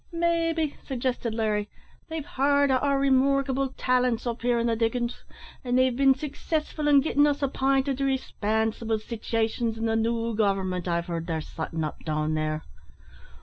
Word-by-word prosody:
"Maybe," 330 -2 0
suggested 250 -3 -2
Larry, 210 -2 0 0.4
"they've 320 -2 -4
heard 285 +1 +2
o' 260 - +4
our 280 +1 +1
remarkable 275 0 +2
talents 250 -2 +1
up 235 -1 -3
here 240 0 +2
in 235 - 0
the 230 -1 +1
diggin's, 235 +1 -1 0.4
and 250 -1 +1
they've 255 -1 +3
been 270 0 +5
successful 300 +2 -3
in 285 -2 +6
gittin' 290 -1 +3
us 290 0 -1
app'inted 270 0 +1
to 275 - +1
respansible 220 -3 -1
sitivations 225 0 -2
in 225 - -2
the 225 0 +1
new 230 +1 0
government 190 -4 0
I've 170 -1 0
heared 170 -2 -4
they're 165 -2 -1
sottin' 160 +1 -4
up 155 - -5
down 155 0 -1
there. 155 0 -1
245 Hz, 160 wpm, -26 LUFS, 220-275 Hz, 0.4 s, in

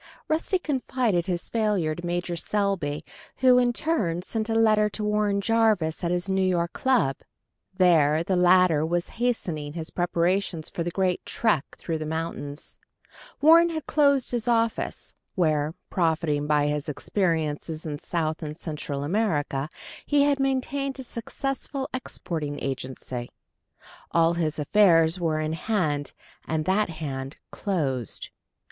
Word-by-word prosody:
Rusty 325 +4 +1
confided 255 - 0
his 175 -2 -2
failure 210 -8 0
to 175 - -8
Major 175 0 -2
Selby, 185 -6 -1 0.3
who 255 -1 +5
in 245 -1 +3
turn 210 - 0
sent 220 +3 -3
a 225 - 0
letter 215 -1 +4
to 210 - -5
Warren 210 -1 +1
Jarvis 210 -7 +2
at 170 - +1
his 180 +1 -1
New 190 0 +1
York 175 -2 +1
club. 240 - +2 0.6
There 160 -4 +4
the 185 +2 0
latter 180 -3 +5
was 170 +2 -1
hastening 165 -12 -1
his 160 -1 -5
preparations 175 -1 0
for - - -4
the 170 - -1
great 185 0 0
trek 205 -11 +1
through 165 -2 -3
the 155 - -4
mountains. 155 -2 -5 0.6
Warren 330 +3 +7
had 315 -2 -4
closed 280 -3 +3
his 240 -1 -1
office, 230 -1 0 0.2
where, 155 -3 +1 0.2
profiting 160 -4 +1
by 150 -1 +3
his 150 +1 -1
experiences 160 -1 -1
in 150 -2 -4
South 160 -1 -2
and 155 -1 -6
Central 150 -4 -4
America, 150 -6 0 0.3
he 290 -1 +3
had 285 -1 +2
maintained 270 +1 -1
a 265 - -6
successful 270 +3 -4
exporting 160 - -4
agency: 130 -2 -5 0.8
all 165 0 +3
his 160 -3 -1
affairs 165 +1 +4
were 160 -3 0
in 155 0 -1
hand, 160 -6 -1 0.3
and 155 -1 -1
that 195 +1 +2
hand 140 -4 -5
closed. 135 - -2
175 Hz, 140 wpm, -26 LUFS, 155-220 Hz, 0.8 s, Warren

